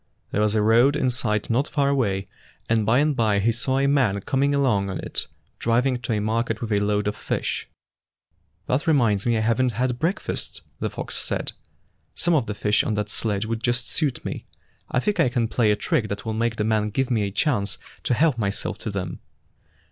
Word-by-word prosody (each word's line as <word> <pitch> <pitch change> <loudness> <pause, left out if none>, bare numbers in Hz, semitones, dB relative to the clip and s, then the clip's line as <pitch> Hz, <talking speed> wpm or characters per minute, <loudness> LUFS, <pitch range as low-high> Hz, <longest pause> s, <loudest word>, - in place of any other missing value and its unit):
There 105 - +1
was 105 0 +2
a 105 - +3
road 120 +6 +5
in 130 -4 +1
sight 110 -3 0
not 135 +6 +2
far 140 -2 +1
away, 100 -9 0 0.4
and 110 -2 +1
by 115 +3 +4
and 150 +1 +2
by 110 -4 +2
he 105 +4 +3
saw 125 +3 0
a 135 - +2
man 130 -8 +2
coming 140 +6 +1
along 110 -9 +2
on 95 - -3
it, - - -2 0.3
driving 125 +2 +1
to 115 -3 -1
market 110 +1 -1
with 115 -2 -4
a 100 - +3
load 105 0 0
of 105 - -1
fish. - - -3 1.0
''That 130 +5 0
reminds 115 -9 +3
me 120 -1 +3
I - - +1
have 115 +2 +2
n't 125 -2 +1
had 125 +2 -1
break 170 +5 0
fast," - - -5 0.2
the - - -1
fox - - -5
said. - - -2 0.3
" - - -43
Some 175 - +1
of 140 -8 +2
the 105 - -3
fish 105 +1 +2
on 110 - -1
that 105 0 -2
sledge 105 -2 -1
would 115 0 -3
just 120 0 0
suit 145 -6 -1
me. - - -5 0.4
I 130 - +1
think 205 +7 -1
I 150 -7 +4
can 120 -1 0
play 115 -1 +2
a 105 - +4
trick 130 - 0
that 100 +1 -5
will 110 - -2
make 115 +1 0
the 105 - -1
man 105 -1 +1
give 130 +5 -1
me 115 -3 +2
a 100 - 0
chance 105 -3 0 0.3
to 125 - +2
help 145 -3 +2
myself 100 -1 -2
to - - -4
them." 95 -4 -4
115 Hz, 225 wpm, -24 LUFS, 105-130 Hz, 1.0 s, road